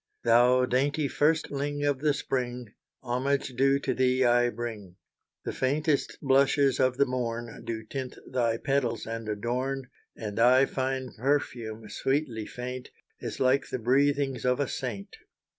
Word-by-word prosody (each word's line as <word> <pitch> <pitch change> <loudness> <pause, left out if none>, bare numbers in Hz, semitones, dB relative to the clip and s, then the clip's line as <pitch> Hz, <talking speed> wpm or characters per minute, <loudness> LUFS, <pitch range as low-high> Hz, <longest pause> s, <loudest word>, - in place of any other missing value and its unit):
Thou 125 +2 +5
dainty 140 +4 +1
firstling 145 -1 0
of 145 -2 +1
the 150 0 +2
spring, 125 -5 -3 0.3
Homage 130 +3 0
due 135 +2 +3
to - - 0
thee, 130 0 +2
I 120 0 +4
bring. 110 -7 -6 0.5
The - - -3
faintest 145 +2 0
blushes 135 0 +3
of 130 -1 +2
the 140 - +4
morn 120 -2 -4
Do 110 -1 -4
tint 130 +3 -6
thy 120 -3 0
petals 125 -3 -1
and 115 -1 -5
adorn, 125 +5 -2 0.2
And 105 -1 -5
thy 130 +3 +6
fine 130 -1 -2
perfume, 115 -5 -1
sweetly 135 -4 -1
faint, 125 +1 -6 0.3
Is - - -6
like 130 +1 +2
the - - -2
breathings 135 +1 +1
of 125 +2 +2
a 145 - +1
saint. 110 -8 -5
130 Hz, 140 wpm, -28 LUFS, 120-135 Hz, 0.5 s, thy